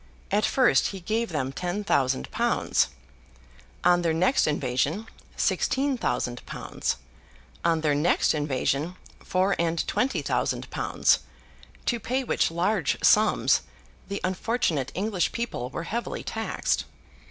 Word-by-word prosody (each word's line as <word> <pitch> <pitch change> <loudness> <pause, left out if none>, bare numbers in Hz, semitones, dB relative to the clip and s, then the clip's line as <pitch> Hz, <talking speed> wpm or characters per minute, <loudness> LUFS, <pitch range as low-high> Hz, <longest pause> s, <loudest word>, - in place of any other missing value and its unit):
At 205 +2 +3
first, 260 -2 +4
he 195 - -6
gave 220 +6 -1
them 135 -5 -2
ten 180 +7 -3
thousand 130 - +1
pounds; - - +2 1.0
on 175 0 +5
their 165 -2 +1
next 185 +11 +3
invasion, 145 - 0 0.3
sixteen 275 +1 +1
thousand 125 - -2
pounds; - - -3 0.7
on 165 -1 +2
their 150 -2 +2
next 150 +4 +3
invasion, 150 +2 -1 0.2
four 190 +2 +1
and 165 0 0
twenty 260 +2 0
thousand - - -1
pounds: - - +2 0.7
to 240 - +1
pay 255 +5 -1
which - - +1
large 175 0 +1
sums, 215 +1 +4 0.5
the 200 0 -3
unfortunate 185 - 0
English 195 -1 0
people 230 - -3
were 165 - -5
heavily 235 +7 -3
taxed. - - -1
175 Hz, 125 wpm, -26 LUFS, 150-215 Hz, 1.0 s, on